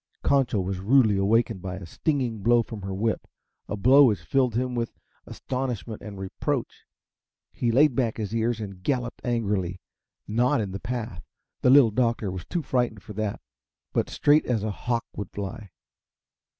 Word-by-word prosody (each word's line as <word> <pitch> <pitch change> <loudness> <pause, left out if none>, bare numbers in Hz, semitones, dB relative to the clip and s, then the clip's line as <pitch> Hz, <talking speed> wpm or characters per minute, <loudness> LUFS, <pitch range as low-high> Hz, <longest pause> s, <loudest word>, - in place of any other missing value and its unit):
Concho 135 -6 +2
was 95 0 -2
rudely 110 +1 +4
awakened 105 +1 +2
by 95 -1 -5
a 95 - -8
stinging 125 - -1
blow 120 +3 +4
from 110 -2 -8
her 95 0 -5
whip 110 +3 -1 0.4
a 105 - -2
blow 135 +7 +7
which 105 -9 +1
filled 125 +5 +1
him 125 +1 0
with 120 -1 -3 0.3
astonishment 125 -4 -4
and 105 -2 -8
reproach. 95 0 -3 0.6
He 120 - 0
laid 140 +4 +5
back 120 -3 0
his 110 -1 -4
ears 115 0 0
and 100 -4 -7
galloped 125 +1 -2
angrily 100 -7 -1 0.5
not 120 +4 +2
in 100 -3 -2
the 95 - -5
path 115 -7 -4 0.4
the - - +4
Little 130 -4 +7
Doctor 115 -3 0
was 90 -2 -6
too 170 - -2
frightened 120 -6 -1
for 105 - -9
that 105 0 -3 0.5
but - - 0
straight 150 +1 +3
as 115 -4 0
a 110 - -1
hawk 120 +3 -2
would 100 -3 -5
fly. 100 +1 -6
115 Hz, 170 wpm, -26 LUFS, 100-125 Hz, 0.6 s, blow